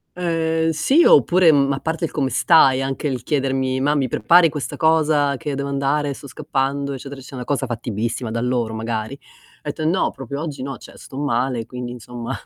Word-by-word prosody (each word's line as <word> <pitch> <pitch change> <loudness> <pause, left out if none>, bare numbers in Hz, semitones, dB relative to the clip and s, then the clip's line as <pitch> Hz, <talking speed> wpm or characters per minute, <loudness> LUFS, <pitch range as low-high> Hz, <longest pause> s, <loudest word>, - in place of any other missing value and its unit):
Ehm, 165 -2 0
sì, 265 - +3
oppure, 185 - +6
mhmm, 140 -2 +3
a 135 - -3
parte 165 +2 -2
il - - -6
"come 135 -3 -1
stai?" 135 -4 +4
Anche 135 +2 -3
il 130 -4 -3
chiedermi: 130 -2 0
"Ma 145 +2 +2
mi 135 -3 +1
prepari 165 +10 +4
questa 145 -2 -5
cosa 155 -3 +2
che 150 - -5
io 140 - -2
devo 140 +1 -3
andare? 140 +1 0
Sto 140 - -11
scappando", 140 -1 -2
eccetera, 135 +1 -8
eccetera, 130 -1 -8
cosa 135 0 -1
fattibilissima 115 0 -3
da 115 +1 -2
loro 120 -2 -1
magari, 110 +2 -3
ho - - -20
etto: 150 +2 -4
"Eh, - - -1
no, 175 +4 +1
proprio 135 +1 -7
oggi 150 -4 -5
no, 135 +1 -5
cioè - - -14
sto 135 - -11
male". 125 -4 -1
Quindi, 125 -1 -6
insomma, 120 -1 -7
140 Hz, 200 wpm, -21 LUFS, 125-155 Hz, -, oppure